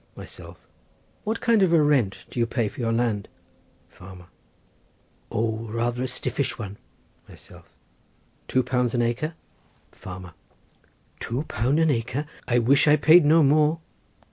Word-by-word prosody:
Myself.—What 220 +2 -9
kind 230 -3 +3
of 185 -3 +3
a 165 - +6
rent 140 -10 +1
do - - -5
you 115 - +2
pay 115 -1 -1
for - - -14
your 115 -1 0
land? 115 -3 -1 0.6
Farmer.—O, 95 +4 -9
rather 120 +2 -2
a 130 - -1
stiffish 130 +2 -3
one. 105 -3 -7 0.5
Myself.—Two 130 - -8
pound 125 -1 0
an 120 - +2
acre? 125 +8 -2 0.6
Farmer.—Two 90 - -10
pound 130 +1 -1
an 160 -2 +3
acre! 125 +4 -2 0.2
I 120 - +2
wish 135 +6 +3
I 150 - +7
paid 155 +1 +6
no 160 +2 +5
more. 150 +3 +3
125 Hz, 125 wpm, -24 LUFS, 115-150 Hz, 0.6 s, I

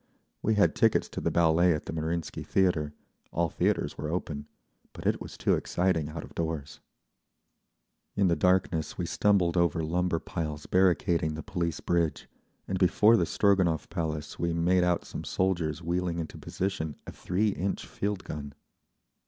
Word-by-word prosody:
We 110 - +2
had 105 - +4
tickets 115 -1 +3
to - - -5
the - - +1
Ballet 85 +1 +4
at 75 - -6
the - - -5
Marinsky 80 +1 -3
Theatre—all 85 -1 -1
theatres - - 0
were 75 - -3
open—but 75 -4 -7
it - - +1
was - - -8
too - - +2
exciting 85 -4 0
out 80 0 -6
of - - -12
doors…. 80 -4 -4 1.4
In 100 -1 +3
the 85 - +3
darkness 90 -3 +1
we - - -1
stumbled 95 -5 +2
over 85 -2 +2
lumber 90 +2 0
piles 75 -2 -4
barricading 85 -4 +2
the 80 - -6
Police 85 -2 -2
Bridge, 85 -4 0 0.4
and 95 - -2
before 105 +4 +5
the 85 -6 +2
Stroganov 95 -6 +2
Palace 80 -3 -3
made 85 +2 +2
out 90 -1 +1
some - - -6
soldiers 85 -4 -1
wheeling 85 0 -1
into 80 -2 -5
position 90 -6 -3
a - - -7
three 100 +5 0
inch 95 0 -2
field 100 -1 -3
gun. 70 -2 -7
85 Hz, 150 wpm, -29 LUFS, 80-90 Hz, 1.4 s, before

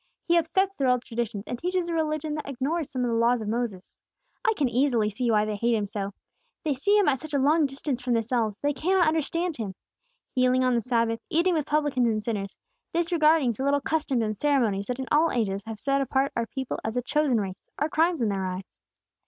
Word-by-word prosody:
He 340 - +2
upsets 380 +4 +2
their 275 -8 0
old 250 -1 +2
traditions, 230 -3 -3
and 245 - -5
teaches 360 +1 -1
a 340 - -2
religion 310 -1 -1
that 300 -2 -5
ignores 280 +4 -2
some 255 -3 -2
of 240 - 0
the - - +1
Laws 235 +1 +3
of - - -6
Moses. 220 -4 -3 0.4
I 450 - +3
can 285 - +2
easily 240 -3 +2
see 240 +4 -1
why 210 -1 +3
they 215 -1 -2
hate 235 +3 +1
Him 210 -2 0
so. 200 -1 -4 0.5
They 305 -3 +1
see 400 +11 +2
Him 410 - +3
at 270 -3 +2
such 310 0 -5
a - - +4
long 295 +3 +3
distance 270 -1 -4
from 245 -1 0
themselves, 225 -2 0
they 290 +3 0
can 355 +8 +1
not 350 -3 +4
understand 325 +2 0
Him. 205 -5 -4 0.6
Healing 255 0 +3
on 255 -1 +3
the 235 - +2
Sabbath, 230 -1 0
eating 345 +3 +2
with 310 -4 -1
publicans 290 -5 +1
and 215 -1 -1
sinners, 205 -3 -3 0.4
disregarding 320 -5 +3
the 230 +4 -5
little 285 +1 +2
customs 280 -5 0
and 215 -1 -2
ceremonies 225 -7 +1
that 250 - -2
in 265 - -4
all 315 +2 +4
ages 200 -5 -1
have 225 -1 -5
set 275 +4 +1
apart 270 0 +1
our 230 0 -1
people 265 +2 -4
as 220 +2 -3
a 245 - 0
chosen 280 -3 +2
race, 190 -2 -5 0.2
are 295 - +1
crimes 325 -2 +1
in 220 - +2
their 195 -1 -1
eyes. 185 +1 -7
255 Hz, 230 wpm, -26 LUFS, 225-305 Hz, 0.6 s, a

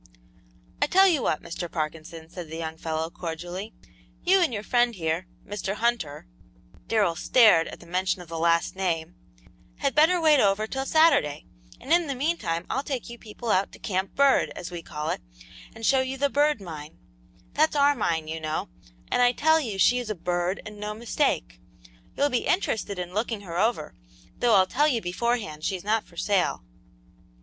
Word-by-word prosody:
"I - - +4
tell 385 +4 +6
you 325 -7 +2
what, 155 - -1
Mr. 170 0 -6
Parkinson," 160 +1 -5
said 170 -1 -9
the 160 - -6
young 160 -1 -4
fellow, 160 0 -3
cordially, 175 +5 -6 0.5
"you 380 +2 +5
and 335 - +2
your 210 -3 -4
friend 240 0 +2
here, 165 +1 -2 0.2
Mr. 205 -1 -4
Hunter," 220 -11 -1 0.6
Darrell 205 -7 +2
started 195 -4 +5
at - - -10
the - - -13
mention 185 +2 -1
of 175 - -10
the 165 0 -5
latter 170 0 +2
name, 175 -3 -2 0.6
"had 275 - -1
better 325 +4 +4
wait 310 -3 +5
over 200 0 +3
till 265 +4 -4
Saturday, 280 - +3 0.3
and 270 +6 -1
in 345 -1 +3
the 275 - -2
mean 310 +7 0
time 165 - -3
I'll 270 - -1
take 265 -4 -5
you 235 - -10
people 220 +1 -5
out 190 +2 +2
to - - -11
Camp 190 -1 -3
Bird, 280 -1 +4
as 180 - -7
we 175 -1 -6
call 155 0 -4
it, - - -4 0.5
and 225 0 -6
show 265 +2 +4
you 260 +1 -3
the 280 +1 +1
Bird 295 -2 +2
Mine; 155 - -9 0.6
that's 310 +1 +2
our 285 0 +5
mine, 165 - -1
you 160 +1 -4
know, 155 - -3 0.4
and - - +2
I 245 0 +5
tell 315 +4 +3
you 225 -10 -4
she 245 +6 +4
is 240 -3 -6
a 215 - -2
'bird,' 175 +2 -2
and 210 0 -9
no 210 0 -4
mistake. - - -1 0.6
You'll 285 +1 +3
be 250 -3 -1
interested 215 - 0
in 180 0 -5
looking 220 0 -2
her 175 -3 -5
over, 215 -8 0 0.5
though 240 -3 +4
I'll 190 -1 +6
tell 290 +10 +2
you 255 -6 +1
beforehand 185 -4 -2
she's 185 0 -2
not 215 +2 0
for 170 - -19
sale." 195 - 0
205 Hz, 195 wpm, -26 LUFS, 170-255 Hz, 0.6 s, tell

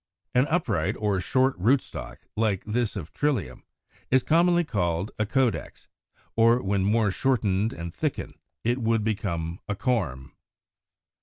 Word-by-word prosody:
An 125 +3 +3
upright 110 - 0
or 100 -3 0
short 130 +7 +2
rootstock, 95 - 0
like 105 -4 +1
this 115 +1 -1
of 90 -5 -6
Trillium, 125 - -1 0.5
is 130 0 +4
commonly 175 +2 +4
called 90 - -1
a 110 - +1
CAUDEX 130 0 -1 0.5
(93); 115 - +3
or 115 +2 +5
when 95 0 +1
more 105 +1 +2
shortened 110 -3 +1
and 85 0 -6
thickened - - -3 0.2
it 120 +3 +1
would 115 -2 +1
become 85 -6 -2
a 105 - 0
corm. 80 - -1
110 Hz, 140 wpm, -26 LUFS, 95-125 Hz, 0.5 s, or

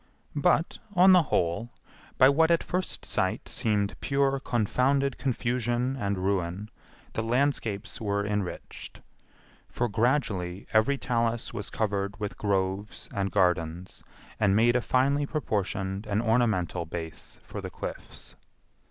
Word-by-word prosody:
But, 150 +3 +2 0.2
on 185 +2 +7
the 180 -1 +8
whole, 100 - 0 0.5
by 130 - +8
what 160 +4 +4
at 170 -1 +3
first 185 +1 -3
sight - - -1
seemed 105 -2 0
pure 140 -1 +1
confounded 130 +3 +1
confusion 125 0 0
and 100 -6 -1
ruin, 95 +2 -2 0.4
the - - -1
landscapes 115 -4 -1
were 100 -1 0
enriched; 105 -3 -5 0.7
for 120 - -1
gradually 100 -5 0
every 110 +6 +3
talus 115 -3 -1
was 105 -3 -4
covered 100 -1 -2
with 105 -1 -4
groves 100 0 -2
and 100 -1 -1
gardens, 90 -2 0 0.4
and 100 -3 +3
made 120 +3 +4
a 125 - +3
finely 140 +4 +2
proportioned 100 - -2
and 105 0 0
ornamental 110 -8 +1
base 80 -1 -7
for - - -7
the - - -5
cliffs. - - -8
110 Hz, 125 wpm, -28 LUFS, 100-130 Hz, 0.7 s, the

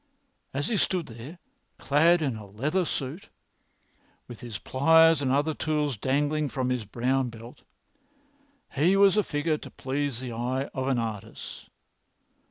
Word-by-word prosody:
As 140 +2 -2
he 225 - 0
stood 180 -3 +1
there, 120 +9 -10 0.4
clad 160 +4 +3
in 135 -5 -1
a 105 -2 -9
leather 150 - -1
suit, 145 +5 -4 1.0
with 120 - -10
his 115 -4 -6
pliers 160 - +4
and 130 -2 0
other 145 +4 +2
tools 150 -3 -1
dangling 145 +6 0
from 130 -1 -1
his 125 -4 -2
brown 125 +4 0
belt, 115 +1 -12 1.1
he 160 +7 +3
was 200 -1 +6
a 210 - +4
figure 150 -1 -1
to - - -10
please 135 -2 -3
the 125 -1 -5
eye 130 +4 -2
of 130 -1 -2
an 135 -2 +1
artist. 110 -4 -6
135 Hz, 150 wpm, -27 LUFS, 125-155 Hz, 1.1 s, was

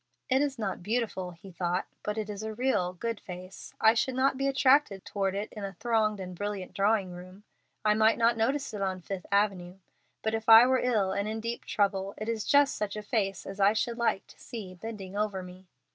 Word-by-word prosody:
"It 265 +1 +3
is 285 -2 -1
not 205 -5 -3
beautiful," 210 -3 -2
he 180 +2 -13
thought, 175 +1 -1 0.2
"but 210 +1 -3
it 215 -1 -2
is 205 -1 -6
a 220 0 -5
real, 225 -8 +1
good 230 +4 -3
face. 185 +1 -10
I 220 0 +6
should 250 +2 0
not 265 +1 +2
be 275 +1 0
attracted 270 -7 +3
toward 195 -1 -1
it 205 +2 -3
in 210 - -7
a 195 -1 -4
thronged 215 0 0
and 185 -1 -6
brilliant 205 0 -4
drawing 200 -2 +1
room. 185 +3 -11 0.4
I 210 - +5
might 220 +1 +4
not 235 0 +3
notice 265 +5 0
it 205 - -4
on 190 -1 -1
Fifth 185 0 -6
Avenue, 195 -3 +1 0.5
but 220 - 0
if 225 0 -2
I 225 +2 +10
were 260 0 +3
ill 215 -6 +1
and 200 +2 -1
in 220 +1 -3
deep 230 +1 -4
trouble, 195 -1 0
it 215 - -5
is 225 -2 -2
just 285 -1 +4
such 210 -1 -3
a 210 - -5
face 200 -3 -1
as 195 +1 -8
I 200 +1 +5
should 235 +2 -1
like 235 -4 +1
to - - -19
see 215 -7 -8
bending 195 0 -8
over 205 -3 -1
me. 180 +1 -12
210 Hz, 220 wpm, -29 LUFS, 190-230 Hz, 0.5 s, I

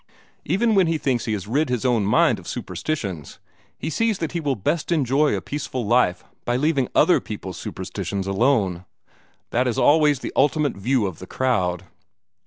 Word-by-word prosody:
Even 225 +2 +2
when 190 -4 +4
he 165 0 +1
thinks 130 -5 -1
he 110 - -1
has 100 -3 -3
rid 140 +5 0
his 125 -1 -1
own 115 -5 +2
mind 105 - +3
of - - -13
superstitions, 100 - -4 0.4
he 160 - -4
sees 225 +3 +1
that 165 - -3
he 175 - -2
will 145 -4 -1
best 150 - -2
enjoy 145 -1 +2
a - - -3
peaceful 135 -4 -4
life 110 -5 +2 0.2
by 120 - -1
leaving 140 -1 +1
other - - +5
peoples' - - -7
superstitions 100 -2 -4
alone. 95 -4 +1 0.7
That 125 +2 +1
is 120 - -1
always 150 -2 +4
the - - -5
ultimate 145 0 +2
view 120 +3 +1
of 95 -5 -5
the 95 - -9
crowd." 95 -9 0
130 Hz, 180 wpm, -23 LUFS, 105-150 Hz, 0.7 s, other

